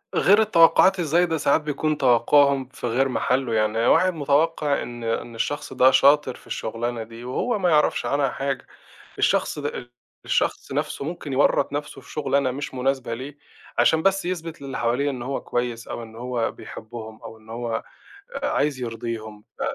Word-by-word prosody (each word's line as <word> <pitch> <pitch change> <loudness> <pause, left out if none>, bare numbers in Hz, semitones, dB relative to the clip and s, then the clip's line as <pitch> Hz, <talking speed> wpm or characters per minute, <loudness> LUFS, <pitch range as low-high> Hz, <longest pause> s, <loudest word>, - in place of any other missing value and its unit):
غير 205 +3 +5
التوقعات 190 -1 +5
إزاي، 170 +1 +2
ده 165 -2 -1
ساعات 145 0 +2
بيكون 150 +1 -1
توقعهم 135 +2 +4
في 125 - -6
غير 130 +3 +1
محلُّه، 125 -1 0
يعني 110 +2 +1
واحد 185 +3 +4
متوقّع 150 0 +1
إن 120 -1 -7
إن 115 +1 -3
الشخص 145 +6 -3
ده 130 +1 +5
شاطر 140 -2 +4
في - - -18
الشغلانة 115 +1 -3
دي، 115 +1 -11
وهو 205 - -1
ما 180 - +2
يعرفش 150 -2 +2
عنها 140 -1 +1
حاجة، 135 0 -3 0.5
الشخص - - +1
ده 145 -4 -5 0.3
الشخص - - -1
نفسُه - - -2
ممكن 155 -2 -5
يوّرط 135 +1 +2
نفسُه 145 -1 -5
في 135 - -17
شغلانه 140 -2 +1
مش 135 +1 -5
مناسبة 130 -2 -1
ليه، 135 +5 -8 0.4
عشان 160 0 +4
بس 195 0 +2
يثبت 165 -4 -5
للي 135 -1 -5
حواليه 125 +5 +1
إن 130 -3 -5
هو 135 +3 -3
كويس 120 -1 -3
أو - - -5
إن 110 -1 -11
هو 120 -1 -2
بيحبّهم 110 -1 -10
أو 110 - -10
إن 110 0 -17
هو 115 -1 -3 0.6
عايز 150 - 0
يرضيهم 115 -2 -5
ف - - -10
135 Hz, 170 wpm, -23 LUFS, 120-150 Hz, 0.6 s, غير